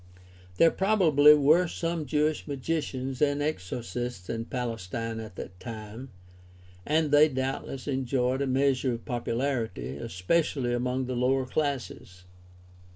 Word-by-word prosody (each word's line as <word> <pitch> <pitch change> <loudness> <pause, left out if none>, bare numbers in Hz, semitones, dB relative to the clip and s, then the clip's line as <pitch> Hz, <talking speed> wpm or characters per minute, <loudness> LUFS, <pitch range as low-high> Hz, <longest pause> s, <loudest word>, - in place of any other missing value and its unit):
There 165 - +6
probably 160 -8 +5
were 155 +5 +4
some 165 -2 -3
Jewish 150 +3 0
magicians 135 -2 -3
and 145 -1 +2
exorcists 120 -5 -4
in 115 0 -3
Palestine 115 -2 -4
at 110 -4 -8
that 90 +1 -8
time, 110 +3 -8 0.8
and 155 0 +2
they 150 +1 +6
doubtless 130 0 -4
enjoyed 130 -1 0
a 140 - 0
measure 130 -1 +1
of 115 - -7
popularity, 115 - -2
especially 120 - 0
among 125 +2 -1
the 125 0 -3
lower 130 +2 +1
classes. 130 - -3
130 Hz, 120 wpm, -28 LUFS, 115-145 Hz, 0.8 s, There